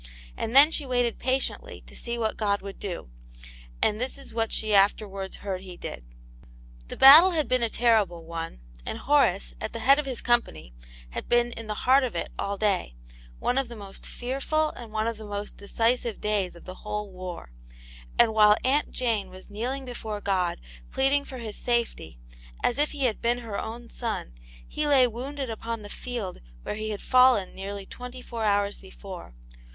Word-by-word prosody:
And 225 +3 -3
then 290 +3 +9
she 310 - -1
waited 245 -2 +1
patiently 260 +1 -2
to - - -14
see 235 0 -4
what 220 -2 -1
God 200 -2 0
w6uld 195 0 -8
do, 180 - -5 0.7
and 215 +2 +2
this 260 +2 -2
IS 275 - -12
what 225 -1 0
she 215 -1 0
afterwards 195 -1 +2
heard 190 -2 -4
He 185 -2 -10
did. - - -7 0.8
The - - -7
battle 310 +8 +10
had 310 -3 +1
been 255 -1 +2
a 230 - +1
terrible 215 -9 +2
one, 165 - -6 0.2
and - - -4
Horace, - - +2
at - - -4
the 230 - -4
head 275 +5 +6
of 295 - -2
his 255 -3 -3
company, 155 - 0 0.4
had - - -6
been 240 0 +3
in 230 -1 -7
the 210 -1 -4
heart 265 +2 +6
of 250 - -2
it - - -3
all 200 0 -2
day; 195 - 0 0.4
one 250 +2 +1
of 270 -3 -2
the 235 - -8
most 200 -2 -9
fearful 275 +5 -1
and 235 -3 -10
one 215 0 0
of 230 -1 -2
the 220 - -9
most 205 0 -5
decisive 230 +2 0
days 205 -4 0
of 170 - -14
the 185 0 -9
whole 210 -1 -4
war. 180 - -7 0.7
And 225 -2 +5
while 210 -1 +6
Aunt 280 +3 +2
Jane 225 -6 -1
was 185 +2 -12
kneeling 255 +6 -3
before 220 -4 -5
God, 190 -3 0 0.3
pleading 275 +1 +2
for 260 - -8
his 225 -3 -6
safety, 235 - -1 0.5
as 245 - +1
if 295 - +3
he 285 -2 -3
had 230 -4 0
been 240 +1 +2
her 225 -4 -5
own 235 +2 -6
son, 220 - -3 0.3
he 300 0 -1
lay 275 -3 +6
wounded 260 +2 -4
upon 225 0 -5
the 205 - -8
field 235 -7 -5 0.2
where - - -3
he 215 +1 -4
had 210 -2 -4
fallen 255 -6 +5
nearly 200 +1 -6
twenty 250 +4 -9
four 230 -2 -5
hours 205 0 +1
before. 190 - -10
225 Hz, 190 wpm, -27 LUFS, 200-250 Hz, 0.8 s, battle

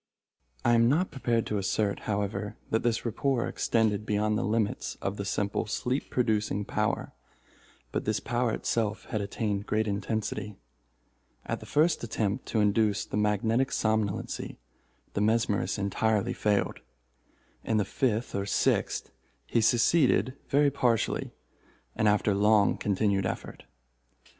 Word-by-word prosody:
I 120 - +5
am 115 0 +5
not 170 +7 +1
prepared 120 -5 0
to 105 - -1
assert, 100 +1 0
however, 105 0 -3
that 110 - +2
this 115 0 0
rapport 120 +2 0
extended 110 -3 +1
beyond 105 0 0
the 110 - 0
limits 105 -1 -1
of 100 +1 -3
the 100 - -4
simple 100 0 -1
sleep 125 +5 -2
producing 105 -4 0
power, - - -1 0.8
but - - -2
this 110 -1 0
power 120 -2 0
itself 110 -2 -1
had 110 -4 0
attained 100 0 -2
great 110 +1 +1
intensity. 105 0 -3 0.9
At - - -3
the - - -11
first 155 0 +2
attempt 110 0 -2
to 110 - +1
induce 105 0 +2
the - - -6
magnetic 110 +5 +1
somnolency, 110 -3 -1 0.6
the 100 - -1
mesmerist 110 -1 +1
entirely 105 +1 0
failed. 105 -1 0 0.8
In 110 - 0
the 105 - +2
fifth 115 +1 -1
or 100 0 -2
sixth - - 0 0.3
he 115 - +1
succeeded 120 - +3 0.2
very 145 0 +4
partially, 120 -5 0 0.6
and 110 - +2
after 105 0 +3
long 105 0 +4
continued 100 -1 +1
effort. - - -6
110 Hz, 135 wpm, -28 LUFS, 105-115 Hz, 0.9 s, I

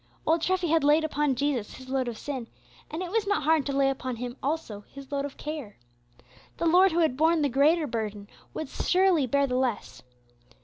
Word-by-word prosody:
Old 325 +1 +2
Treffy 370 -1 0
had 325 -1 +3
laid 300 +2 +4
upon 295 -3 0
Jesus 260 -5 -1
his 260 - -12
load 260 -1 -1
of 235 -2 -4
sin, 260 -4 -5 0.4
and 325 +4 -4
it 355 - -6
was 435 -1 0
not 405 -6 +1
hard 310 -1 +2
to - - -1
lay 275 0 +2
upon 260 -2 -2
Him 245 +1 -5
also 275 -8 -3
his 275 0 -11
load 280 0 -1
of 285 - -8
care. 300 -9 -6 0.8
The - - -2
Lord 360 +3 +5
who 340 +1 +1
had 315 -6 +2
borne 320 +2 +3
the 285 - +2
greater 300 +5 +3
burden 215 -5 -4 0.2
would 315 - -5
surely 360 -3 +2
bear 280 +3 +2
the 250 -2 -1
less. 255 -4 -2
285 Hz, 210 wpm, -27 LUFS, 255-320 Hz, 0.8 s, Lord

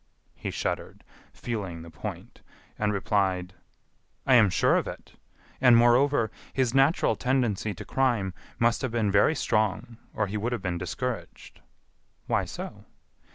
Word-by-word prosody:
He - - -6
shuddered, - - -4 0.3
feeling 95 -8 -5
the 85 - -11
point, 80 - -8 0.4
and 105 -1 +1
replied: 95 -2 0 0.7
"I 135 - +4
am 115 -5 +7
sure 90 - +3
of - - 0
it; - - -9 0.5
and, 125 -3 +7
moreover, 120 -1 +4 0.2
his 130 -3 +1
natural 135 -3 +3
tendency 110 -4 0
to 105 - -8
crime 115 -7 0 0.2
must 115 0 +2
have 130 - -1
been 110 -4 +1
very 100 +10 +4
strong 110 0 0 0.2
or 110 - +1
he 100 +2 -4
would 115 +4 -2
have 120 - -3
been 90 -2 -2
discouraged." 90 - -5 0.7
"Why - - 0
so?" - - -8
110 Hz, 145 wpm, -27 LUFS, 95-125 Hz, 0.7 s, am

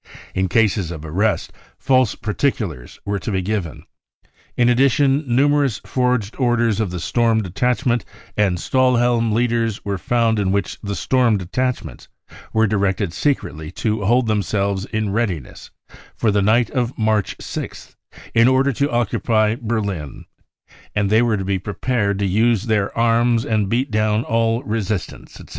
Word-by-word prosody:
In 95 0 0
cases 100 -3 +2
of 80 -2 -7
arrest, 100 +7 -1 0.2
false 130 -4 +2
particulars 105 - -3
were 100 0 -1
to - - -5
be 95 -2 -1
given. 95 -5 -3 0.7
In 120 - +4
addition, 135 +3 +3
numerous 140 -1 +2
forged 125 -5 0
orders 120 -4 +2
of 110 -4 0
the 90 0 -5
Storm 110 +6 +1
Detachment 120 - 0 0.3
and 100 -4 +1
Stahihelm 120 0 +2
leaders 115 -1 0
were 100 -2 -2
found 115 +1 +1
in 95 -2 +1
which 100 -2 -2
the 100 -1 -4
Storm 125 -3 +2
Detachments 125 +8 -3 0.4
were 110 0 +3
directed 100 -3 0
secretly 80 - -2
to 110 -2 -1
hold 120 +5 +3
themselves 100 -2 -1
in 110 -2 -2
readiness 95 - -3 0.5
for 110 - +1
the 100 0 +2
night 115 +4 +2
of 125 -3 -2
March 110 -3 0
6 - - -6 0.3
th, - - -17
in 115 +1 +5
order 130 +2 +3
to 140 +5 0
occupy 110 -2 +1
Berlin, 105 - -4 0.7
and 100 -1 +1
they 110 +2 +5
were 115 -3 +1
to 95 - -4
he 95 0 0
prepared 105 +1 -1
to 100 - -1
use 110 +2 +2
their 105 -3 0
arms 115 0 +2
and 105 -3 0
beat 125 +4 0
down 110 +1 +1
all 115 +1 0
resistance, 110 -5 -4
etc.'' - - -13
110 Hz, 150 wpm, -20 LUFS, 100-120 Hz, 0.7 s, in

